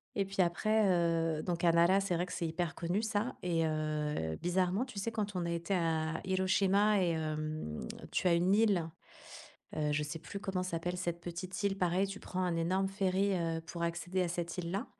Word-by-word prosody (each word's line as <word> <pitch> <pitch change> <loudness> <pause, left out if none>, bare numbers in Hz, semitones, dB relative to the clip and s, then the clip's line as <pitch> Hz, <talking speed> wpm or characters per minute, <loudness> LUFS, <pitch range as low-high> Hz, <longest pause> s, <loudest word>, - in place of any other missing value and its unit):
et 200 - +2
puis 195 0 0
après, 215 +5 +2
heu, 165 -3 +2
donc 175 -2 -2
à 170 - +6
Nara, 170 +3 +5
c'est 195 -2 0
vrai 175 +1 0
que 180 - -10
c'est 170 - -1
hyper 165 +1 -2
connu 175 +5 -1
ça 220 +2 -1
et 165 -2 +1
heu, 150 - -1
bizarrement, 185 +5 +1
tu 250 -6 -11
sais, 230 +4 -2
quand 210 -3 -3
on 180 -1 -1
a 170 - -1
été 170 +3 -2
à 160 -2 0
Hiroshima 195 +2 +3
et 175 - +2
hem, 155 - -3 0.3
tu - - -1
as 175 - +5
une 175 +3 +3
île, 200 -7 +3 0.9
heu, 150 -1 +1
je 150 +1 +1
sais 150 +2 -4
plus 195 +5 -7
comment 195 -3 -2
s'appelle 175 0 -2
cette 175 -1 -3
petite 175 +3 -5
île, 200 -1 +1
pareil, 185 +1 +2
tu 195 +1 -7
prends 185 - -4
un 175 -2 0
énorme 185 +4 +1
ferry, 195 0 +1
heu, 165 -2 -1
pour 170 +1 -7
accéder 175 +2 -1
à 180 - 0
cette 170 0 -3
île-là, 180 +4 -2
175 Hz, 210 wpm, -33 LUFS, 165-195 Hz, 0.9 s, à